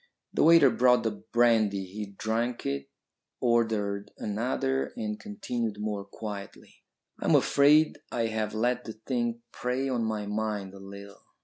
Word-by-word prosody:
The - - +1
waiter 165 -5 +7
brought 125 0 +4
the 110 - +1
brandy. 110 -4 +2
He 105 +3 -6
drank 115 +2 -1
it, 70 0 -3 0.5
ordered 110 -4 +1
another, 130 +5 -1
and 215 -2 -3
continued 125 - -4
more 105 -1 -2
quietly. 100 -1 -8 0.4
"I - - -5
am - - +5
afraid 150 +2 +4
I 115 -1 0
have 110 -1 -2
let 120 +3 0
the 110 - -6
thing 120 0 -2
prey 130 +2 -2
on 120 -3 0
my 110 -2 -2
mind 105 -2 -3
a 100 - -11
little. 100 +1 -11
110 Hz, 145 wpm, -28 LUFS, 105-125 Hz, 0.5 s, waiter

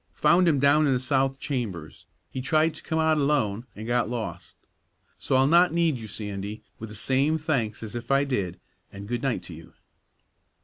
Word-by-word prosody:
Found 175 +4 +4
him 155 -4 +4
down 145 +3 +4
in 135 - +3
the - - 0
south 135 +1 0
chambers; 100 - -5 0.2
he 130 - -4
tried 155 +4 +2
to 155 - -9
come 160 - -3
out 160 -1 +3
alone, 125 -6 0
an' 110 - -7
got 120 -1 +1
lost. 100 -7 -5 0.6
So - - 0
I'll 130 +1 +5
not 170 +4 +5
need 165 -6 +2
you, 110 - -8
Sandy, 105 0 -6 0.2
with 115 - -7
the 105 - -10
same 135 +7 +1
thanks 135 -9 -2
as 110 +1 -7
if 120 0 -6
I 140 +1 +4
did, 100 -11 -2 0.3
an' 100 0 -9
good 120 +2 -3
night 135 -4 -1
to 85 - -9
you!" 80 +1 -13
130 Hz, 195 wpm, -26 LUFS, 110-150 Hz, 0.6 s, I'll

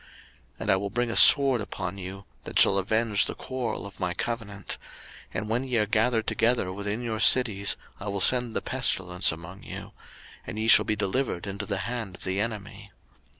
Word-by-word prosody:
03:026:025 - - -23 0.5
And 105 - 0
I - - +4
will 100 +1 -4
bring 120 +2 -2
a - - -4
sword 135 -5 +7
upon 100 -2 -6
you, 95 +1 -8 0.2
that - - -5
shall 100 - +5
avenge 110 +1 +2
the - - -5
quarrel 130 -5 -5
of 100 -1 -11
my 90 0 -2
covenant: 105 -5 -4 0.5
and 105 - -4
when 115 +4 -1
ye 125 -3 -1
are 105 - +2
gathered 110 +2 +1
together 115 -6 0
within 100 +4 -4
your 110 -2 -3
cities, 110 -5 +3 0.2
I 100 - -8
will 100 0 -3
send 120 +3 +3
the - - -1
pestilence 95 -8 +1
among 85 +4 -10
you; - - -9 0.6
and 95 +4 -6
ye 110 +1 -2
shall - - +7
be 110 - 0
delivered 105 -1 -2
into 100 0 -5
the 100 - -2
hand 115 -5 -5
of - - -14
the 95 +1 -2
enemy. 105 -2 -6
105 Hz, 195 wpm, -26 LUFS, 95-115 Hz, 0.6 s, sword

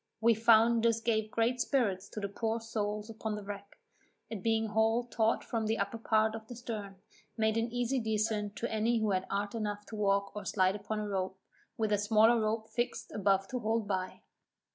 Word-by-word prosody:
We 230 +1 +5
found 230 +1 +5
this 230 -1 +3
gave 220 -2 0
great 235 +3 +1
spirits 215 -7 0
to - - -6
the 200 - -2
poor 225 +3 -2
souls 210 -2 -3
upon 220 -1 -4
the 210 - -6
wreck, 200 0 -8 0.5
it 215 -4 -4
being 225 +1 +1
hauled 225 +3 +1
taught 225 0 +1
from 225 -2 -2
the 220 +1 +1
upper 200 +3 -2
part 220 -1 +2
of 220 -1 -7
the 245 - -8
stern, 215 -5 -6 0.4
made 220 -1 +2
an 230 +1 0
easy 245 +2 0
descent 215 -2 -1
to 235 - -3
any 225 +2 +1
who 215 -2 +1
had 185 -1 0
art 200 +1 -2
enough 210 -2 -3
to 220 - -6
walk 200 -1 +1
or 210 - -5
slide 190 -1 +2
upon 210 +1 -4
a 210 - -3
rope, 190 -1 -2 0.4
with 220 -1 0
a 205 - +3
smaller 220 +2 +4
rope 220 +1 -1
fixed 240 0 -2
above 195 -1 +1
to 255 - -2
hold 220 -1 0
by. 185 -2 -3
220 Hz, 205 wpm, -32 LUFS, 205-230 Hz, 0.5 s, We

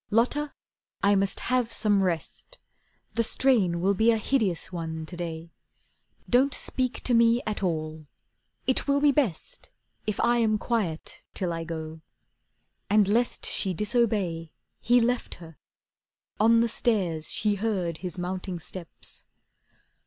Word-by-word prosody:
"Lotta, 265 +7 +1 0.5
I 200 +1 +5
must 195 -1 +1
have 250 -2 0
some 205 -3 +2
rest. 185 - -3 0.6
The 230 - +1
strain 215 -8 +2
will 195 +2 +3
be 220 +4 +3
a 225 - +4
hideous 210 -7 0
one 160 -2 -4
to 175 - -8
day. 165 -1 -6 0.8
Don't 260 +2 +3
speak 255 -1 -1
to 250 - +1
me 235 +1 +4
at 215 -2 -3
all. 155 -4 -3 0.6
It 260 - +2
will 280 0 +3
be 290 0 +5
best 250 - -2 0.4
If 215 - -1
I 240 0 +3
am 220 -2 +2
quiet 205 -9 -2
till 180 -3 -1
I 165 0 -4
go." 160 -1 -6 0.9
And 210 -1 +4
lest 235 +4 +1
She 190 -3 +1
disobey, 205 -7 0 0.3
he 245 +1 +4
left 245 +1 0
her. 165 -2 -13 0.8
On 230 +2 +5
the 235 - +3
stairs 185 -9 0
She 210 -1 +1
heard 195 -6 -2
his 180 -2 -5
mounting 180 +1 -4
steps. 170 +1 -8
205 Hz, 140 wpm, -27 LUFS, 170-235 Hz, 0.9 s, I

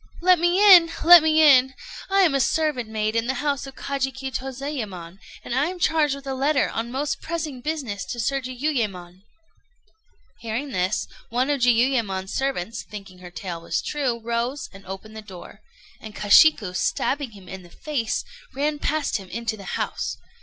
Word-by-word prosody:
"Let 360 0 +4
me 345 +2 +2 0.2
in! 335 -2 +5
let 345 0 +10
me 315 0 +4
in! 265 -3 +6 0.3
I 390 0 +4
am 340 -6 +4
a 275 - +2
servant 295 -4 0
maid 215 0 -2
in 230 0 0
the 265 - -1
house 280 -2 -2
of 270 - -11
Kajiki 265 -1 -3
Tozayémon, 245 - -6 0.3
and - - -4
am 300 +8 0
charged 315 -5 +2
with 280 0 -12
a 270 - -3
letter 280 +2 +1
on 230 +1 -3
most 280 +3 -2
pressing 310 -6 -4
business 260 -10 -4
to 210 +6 -6
Sir 275 +4 0
Jiuyémon." 230 -10 -3 1.2
Hearing 235 +5 -4
this, 185 -1 -1 0.2
one 255 +4 0
of 280 -3 -1
Jiuyémon's 230 -6 +1
servants, 230 -8 -2
thinking 195 0 -11
her 180 -1 -10
tale 175 -1 -6
was 170 - -2
true, 265 -6 -2
rose 235 +4 -3
and 195 -1 -14
opened 195 +3 -8
the 220 - -7
door; 200 +1 -12 0.4
and 215 -1 -11
Kashiku, 210 -1 +5
stabbing 270 +4 -1
him 195 -3 -14
in 190 +1 -8
the 175 - -16
face, 245 - -3 0.3
ran 295 +2 -1
past 300 -4 -1
him 190 -3 -11
into 230 +2 -3
the 200 -2 -12
house. - - -3
255 Hz, 175 wpm, -23 LUFS, 210-290 Hz, 1.2 s, let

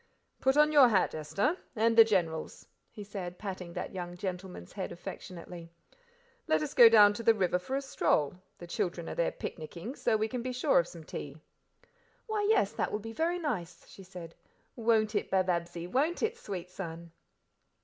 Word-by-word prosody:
"Put 265 +2 +2
on 300 0 +5
your 285 -4 +8
hat, 205 -6 +2
Esther, 155 - 0 0.2
and 225 +1 +2
the 225 - +10
General's," 175 -7 -1 0.2
he 210 - -9
said, 190 -3 -6
patting 185 -4 -6
that - - -5
young 175 -1 -6
gentleman's 180 - -6
head - - -4
affectionately. 170 -1 -9 0.8
"Let 155 0 +2
us - - -4
go 235 -2 +9
down 210 -2 +7
to 205 - -6
the 230 0 +4
river 180 -3 +1
for 260 +9 -4
a 275 - -1
stroll; 150 - +1 0.2
the 175 - -9
children 170 0 -3
are - - -4
down 170 - +1
there - - 0
picnicking, 170 - -7
so 220 - +1
we 215 +1 0
can 250 +1 -4
be 255 +1 -4
sure 260 - +3
of 170 - 0
some 170 -2 -11
tea." 145 -1 -7 0.9
"Why, 425 -2 -1
yes, 410 - +3
that - - -2
will - - 0
be 225 +2 -8
very 335 +6 0
nice," 180 - -4
she - - -13
said, 180 -3 -10 0.4
"won't 225 -2 +2
it - - -1
Bababsie, 175 -2 0
won't 285 - 0
it, 450 +1 0
sweet 185 - -7
son?" 170 -2 -7
195 Hz, 190 wpm, -30 LUFS, 175-230 Hz, 0.9 s, the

